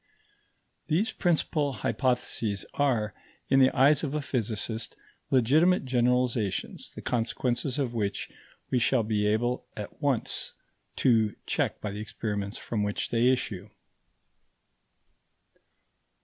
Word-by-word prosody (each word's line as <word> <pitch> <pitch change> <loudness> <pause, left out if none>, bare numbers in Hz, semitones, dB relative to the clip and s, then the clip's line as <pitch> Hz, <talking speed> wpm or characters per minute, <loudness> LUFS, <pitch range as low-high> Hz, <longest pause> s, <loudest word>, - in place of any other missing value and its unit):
These 175 +9 +1
principal 155 -4 +1
hypotheses 115 -2 -1
are, 115 -7 +1 0.4
in 135 - +5
the 130 -1 +7
eyes 145 +4 +4
of 150 -1 -2
a 150 - 0
physicist, 110 -3 -2 0.3
legitimate 150 +8 +4
generalizations, 125 -5 0
the - - -8
consequences 120 +2 -1
of 130 -5 -1
which 100 -4 -2 0.4
we 125 - +3
shall 120 0 +3
be 105 -1 +1
able 120 +4 0
at 105 +7 -7
once 140 -6 -1 0.4
to 110 -4 +3
check - - -1
by 105 - -3
the 105 +1 -5
experiments 105 -1 -4
from 110 -3 -3
which 105 0 -1
they 120 +1 +3
issue. 105 -6 -3
120 Hz, 115 wpm, -28 LUFS, 105-135 Hz, 0.4 s, the